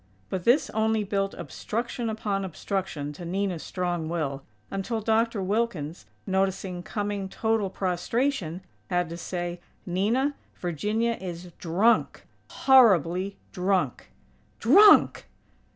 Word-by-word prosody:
But 185 -2 -3
this 250 +6 +4
only 220 0 +1
built 195 -1 -1
obstruction 235 +1 -4
upon 205 -3 -2
obstruction 180 -5 -3
to 160 - -10
Nina's 185 -1 -2
strong 175 -3 -2
will, 145 -5 -2 0.3
until 195 +4 -2
Dr. 220 -1 +1
Wilkins, 185 -6 -2 0.2
noticing 190 -2 -1
coming 205 -1 -3
total 220 -1 0
prostration, 185 - -1 0.3
had 175 -2 0
to 170 - -6
say: 175 0 -4 0.3
"Nina, 220 +11 +1 0.2
Virginia 210 +7 -1
is 175 -1 -7
drunk; 195 +8 +2 0.2
horribly 195 - +4
drunk." 185 0 0 0.5
"_Drunk!! 410 0 +6
195 Hz, 105 wpm, -26 LUFS, 175-220 Hz, 0.5 s, Drunk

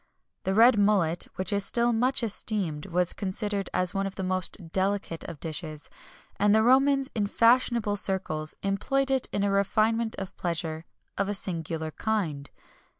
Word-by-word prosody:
The 190 - 0
red 230 0 +6
mullet, 190 -5 +2
which 190 +3 -1
is 200 0 +1
still 235 +3 +3
much 250 +3 +1
esteemed, 200 -7 -1
was 180 -1 0
considered 200 0 -3
as 180 -1 0
one 195 0 -1
of 195 - -8
the 190 - -4
most 185 -2 -3
delicate 190 -3 -1
of 155 - -8
dishes, 155 -2 -5 0.5
and 205 +1 +4
the 220 - +4
Romans 270 +2 +3
in 210 -3 0
fashionable 230 -2 +3
circles 155 -6 0
employed 270 +8 0
it 265 -2 +2
in 200 - -1
a 200 - +1
refinement 220 +3 +1
of 195 0 -7
pleasure 165 -2 -3 0.3
of 200 0 0
a 205 - -1
singular 165 -4 -4
kind. 160 -10 -2
200 Hz, 160 wpm, -27 LUFS, 175-220 Hz, 0.5 s, red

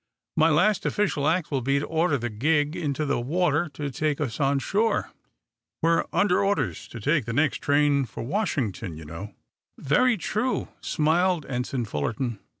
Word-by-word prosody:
"My 160 +1 +4
last 185 +7 +3
official 160 -8 0
act 165 0 +1
will 135 -2 0
be 135 +3 +1
to 140 - -1
order 160 -2 +1
the 120 -2 -4
gig 150 +7 +1
into 150 -4 -2
the 140 -3 0
water 160 +3 +1
to 145 -1 -3
take 150 +1 -1
us 135 -7 -3
on 140 0 +2
shore. 205 - 0 0.7
We're 165 0 +3
under 200 -1 +2
orders 145 - -1
to 120 - -9
take 145 +2 +1
the 115 - -3
next 145 +3 +2
train 145 -1 +2
for 110 - -7
Washington, 125 - -2
you 80 - -9
know." 85 +6 -8 0.4
"Very 235 - +3
true," 215 +7 -1
smiled 165 +1 +1
Ensign 125 -1 -2
Fullerton. 110 - -3
145 Hz, 165 wpm, -26 LUFS, 125-170 Hz, 0.7 s, My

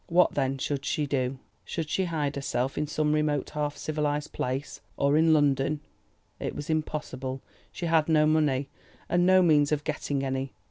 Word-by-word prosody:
What 180 +1 +4
then 135 -1 0
should 140 +1 -2
she 150 +1 0
do? 135 -2 -1 0.3
Should 165 -3 -4
she 190 +5 0
hide 150 -4 -1
herself 135 -1 -1
in 150 - -1
some 150 0 0
remote 150 -2 0
half 150 -1 -2
civilised 150 -1 -2
place, 130 +3 -3 0.2
or 140 +1 +3
in 160 +1 +5
London? 145 -1 +2 0.6
It - - -4
was 145 - -4
impossible; 135 -4 -3 0.3
she 175 - -5
had 165 -1 +2
no 155 -1 +5
money, 150 -3 +2 0.4
and 175 +1 +2
no 185 0 +6
means 150 -3 +4
of 150 -1 0
getting 145 -2 -2
any. 135 0 -2
150 Hz, 175 wpm, -28 LUFS, 140-155 Hz, 0.6 s, no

